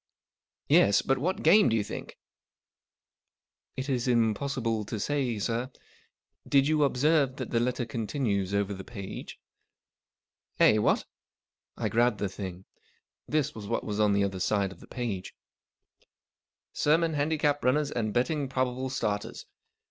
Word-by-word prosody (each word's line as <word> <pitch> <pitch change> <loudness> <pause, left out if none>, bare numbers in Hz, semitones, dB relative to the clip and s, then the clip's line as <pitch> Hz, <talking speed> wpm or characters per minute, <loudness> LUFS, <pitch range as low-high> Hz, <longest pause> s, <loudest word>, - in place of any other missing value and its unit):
" - - -64
Yes. 100 0 +4
But 135 0 +1
what 180 +7 -1
game, 200 +4 +6
do 115 - +1
you 110 - +1
think? - - -8 0.6
" - - -66
" - - -51
It 130 +1 -3
is 130 -3 -1
impossible 115 -1 0
to 110 - -4
say, 130 -2 -1
sir. 115 +4 -2 0.8
Did 140 -1 +4
you 155 -1 +3
observe 140 0 +2
that 130 -3 -6
the 115 - +2
letter 120 0 -1
continues 110 -4 -2
over 100 0 0
the 95 0 -7
page? 100 -4 -8 0.4
" - - -66
" - - -45
Eh, 110 - +6
what? - - +2 0.4
" - - -66 0.3
I - - -1
grabbed 120 -1 +2
the 100 -1 -2
thing. 95 -2 -7 0.6
This 150 -1 0
was 105 -2 -8
what - - -1
was 105 0 -3
on 105 -1 +4
the 100 0 +2
other 95 -1 -2
side 100 +1 0
of - - -13
the - - -15
last - - -38
page:— 110 -7 -4 1.4
SERMON 160 +2 +2
HANDICAP 145 0 0
RUNNERS 145 +3 +2
AND 110 -3 -1
BETTING 135 +4 0
PROBABLE 130 0 -1
STARTERS. 105 -6 -3
120 Hz, 165 wpm, -28 LUFS, 105-140 Hz, 1.4 s, game